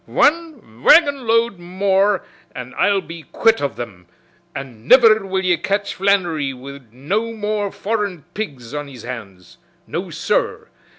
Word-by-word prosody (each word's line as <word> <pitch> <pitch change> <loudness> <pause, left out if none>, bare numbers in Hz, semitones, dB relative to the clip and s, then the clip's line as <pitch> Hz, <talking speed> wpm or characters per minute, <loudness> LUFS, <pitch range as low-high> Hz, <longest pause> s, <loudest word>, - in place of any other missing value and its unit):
"Wan 295 - 0
wagonload 240 - +4
more 190 +2 +1 0.3
an, 125 0 -7
I'll 200 -1 +2
be 165 -2 -9
quit 225 +7 +2
of 140 - -2
thim, 95 -7 -8 0.5
an' 120 -4 -8
niver 225 -5 +7
will 190 0 -1
ye 175 -2 +3
catch 200 +4 -1
Flannery 175 -8 0
wid 135 -2 -11
no 200 - -2
more 210 -2 -2
foreign 205 -6 -3
pigs 135 - -6
on 145 -1 -4
his 130 -5 -11
hands. 100 -8 -9 0.3
No, - - -4
sur! - - -1
190 Hz, 135 wpm, -20 LUFS, 135-215 Hz, 0.5 s, niver